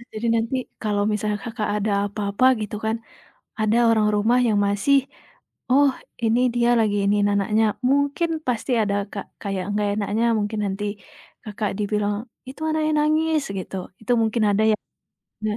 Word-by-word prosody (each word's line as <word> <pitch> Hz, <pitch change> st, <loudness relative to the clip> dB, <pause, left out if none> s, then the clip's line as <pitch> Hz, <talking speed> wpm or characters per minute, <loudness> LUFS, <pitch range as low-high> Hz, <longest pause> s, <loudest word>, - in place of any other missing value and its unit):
Jadi, 235 Hz, -1 st, -6 dB
nanti 230 Hz, +3 st, 0 dB, 0.3 s
kalau 205 Hz, -1 st, 0 dB
misalnya 210 Hz, 0 st, -1 dB
Kakak, 225 Hz, -2 st, -3 dB
ada 210 Hz, 0 st, -1 dB, 0.2 s
apa-apa 205 Hz, +4 st, 0 dB
gitu 210 Hz, 0 st, -4 dB
kan, 220 Hz, +1 st, 0 dB, 0.6 s
ada 215 Hz, +1 st, +2 dB
orang 220 Hz, -2 st, +3 dB
rumah 225 Hz, +4 st, +3 dB
yang 210 Hz, -2 st, +2 dB
masih 205 Hz, +8 st, +3 dB, 0.7 s
"oh 280 Hz, +1 st, +5 dB, 0.3 s
ini 225 Hz, +2 st, +3 dB, 0.2 s
dia 240 Hz, 0 st, +3 dB
lagi 210 Hz, -2 st, +2 dB
iniin 205 Hz, 0 st, +2 dB
anaknya," 210 Hz, +2 st, +2 dB, 0.2 s
mungkin 285 Hz, +5 st, +1 dB, 0.2 s
pasti 250 Hz, +2 st, -1 dB
ada 200 Hz, -1 st, 0 dB, 0.2 s
Kak, 200 Hz, -, -5 dB, 0.2 s
kayak 195 Hz, -2 st, -3 dB
enggak 205 Hz, 0 st, 0 dB
enaknya 215 Hz, +3 st, 0 dB
mungkin 210 Hz, +1 st, -2 dB
nanti 195 Hz, +1 st, -3 dB, 0.6 s
Kakak, 210 Hz, 0 st, -3 dB
dibilang 210 Hz, 0 st, 0 dB, 0.4 s
"itu 275 Hz, -, -11 dB
anaknya 310 Hz, 0 st, +1 dB
nangis," 310 Hz, 0 st, +2 dB
gitu 185 Hz, -, -6 dB, 0.3 s
itu 220 Hz, -, -3 dB
mungkin 220 Hz, 0 st, +1 dB
ada 205 Hz, +2 st, +2 dB
ya. -, -, +3 dB, 0.7 s
Nah, 210 Hz, 0 st, -1 dB
215 Hz, 155 wpm, -23 LUFS, 205-245 Hz, 0.7 s, oh